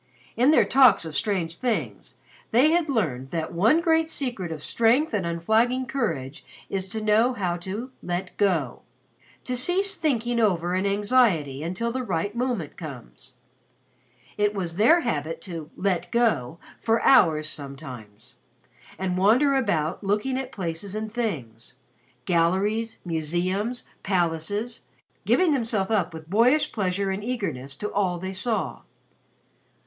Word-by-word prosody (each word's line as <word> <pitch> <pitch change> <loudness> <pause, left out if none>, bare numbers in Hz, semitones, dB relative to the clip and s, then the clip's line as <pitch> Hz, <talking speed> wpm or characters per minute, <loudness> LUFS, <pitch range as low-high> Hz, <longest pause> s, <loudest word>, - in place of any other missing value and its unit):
In 250 +5 +4
their 310 - +5
talks 255 -10 +5
of 160 - -6
strange 180 -6 -1
things 245 -3 -3 0.3
they 260 +7 +4
had 335 -2 +1
learned 140 - -1
that 165 +1 -3
one 220 - +4
great 325 -1 +2
secret 240 - -2
of 155 -2 -6
strength 240 +6 +2
and 195 -5 0
unflagging 220 +10 +1
courage 160 - -3 0.3
is 190 -1 -2
to 215 +3 -4
know 220 +4 +3
how 180 -6 -1
to 205 +9 -6
"let 180 +1 -4
go" 165 -11 0 0.6
to 250 - -3
cease 370 +10 +2
thinking 240 - 0
over 180 -5 +1
an 190 +2 +1
anxiety 200 - +2
until 185 +9 -2
the 260 +2 -2
right 205 -2 -2
moment 235 - -2
comes. 140 - -10 1.0
It 210 0 +2
was 175 -3 -4
their 285 - +5
habit 165 - -2
to 165 -5 -7
"let 185 -3 -1
go" 220 - +1 0.2
for 225 0 +1
hours 155 - +5
sometimes, 135 -8 -9 0.6
and 185 -1 -2
wander 245 +9 +4
about 195 - 0
looking 210 +6 0
at 260 0 -4
places 185 0 -4
and 215 0 -4
things 130 - -4 0.5
galleries, 195 +7 +1
museums, 180 +8 -2 0.2
palaces, 190 +5 -1 0.5
giving 365 -3 +4
themselves 225 -6 -1
up 205 -5 +1
with 160 -1 -10
boyish 240 - +3
pleasure 195 -1 -1
and 195 +2 -4
eagerness 160 - -4
to 210 - -4
all 185 -3 +1
they 190 +2 -5
saw. 220 +4 -2
200 Hz, 140 wpm, -25 LUFS, 165-235 Hz, 1.0 s, their